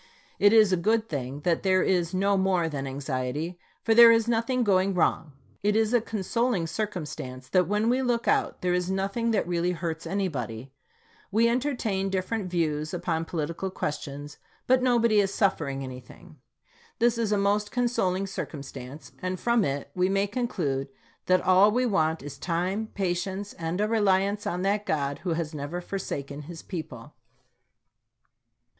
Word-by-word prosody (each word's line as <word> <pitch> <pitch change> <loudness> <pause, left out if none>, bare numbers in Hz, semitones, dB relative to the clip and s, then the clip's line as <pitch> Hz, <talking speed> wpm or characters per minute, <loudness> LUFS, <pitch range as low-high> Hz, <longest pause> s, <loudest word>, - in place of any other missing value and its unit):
It 205 - +6
is 215 -4 +6
a - - +3
good 220 +5 +1
thing 140 - -4
that 170 +1 +1
there 185 -1 +3
is 175 -3 +1
no 195 +2 +2
more 190 -3 +2
than 140 -3 -4
anxiety, 140 +5 -3 0.2
for 225 - +3
there 235 0 +9
is 230 0 +3
nothing 240 +2 +1
going 195 -2 +2
wrong. 160 -3 +1 0.3
It 205 +1 +1
is 220 +1 +2
a 240 - +4
consoling 225 -2 -1
circumstance 155 -9 -5
that 180 +4 +3
when 210 +3 +1
we 250 +2 +2
look 240 -2 0
out, - - +1
there 180 -1 +2
is 180 0 0
nothing 195 +5 -1
that 220 -5 +1
really 175 0 0
hurts 165 -1 -4
anybody. 135 - -3 0.6
We 225 +3 +4
entertain 235 -6 0
different 190 +1 -2
views 155 -2 -1
upon 165 -2 -2
political 170 +3 -3
questions, 145 -4 -5 0.3
but 255 0 +4
nobody 235 -4 +3
is 195 -1 +2
suffering 140 -10 0
anything. 130 +5 -11 0.6
This 235 0 +2
is 220 -2 0
a 210 - +3
most 205 +1 +1
consoling 195 -7 0
circum 165 -6 -5
stance, 135 +2 -10
and 185 0 -3
from 235 -2 +2
it 140 -3 -3
we 180 +1 +1
may 195 +1 +2
conclude 185 - -2 0.4
that 185 0 +4
all 185 +3 +5
we 250 +4 +1
want 160 - +1
is 145 -1 -8
time, 185 +6 -1
patience, 190 +1 -2
and 165 +2 -4
a 210 - +2
reliance 205 -2 +1
on 180 +1 -2
that 200 +1 +1
God 140 -2 -1
who 175 -2 -2
has 160 -1 -3
never 150 +4 -4
forsaken 145 -6 -5
this 170 -2 -8
people. 150 - -7
185 Hz, 165 wpm, -27 LUFS, 160-210 Hz, 0.6 s, there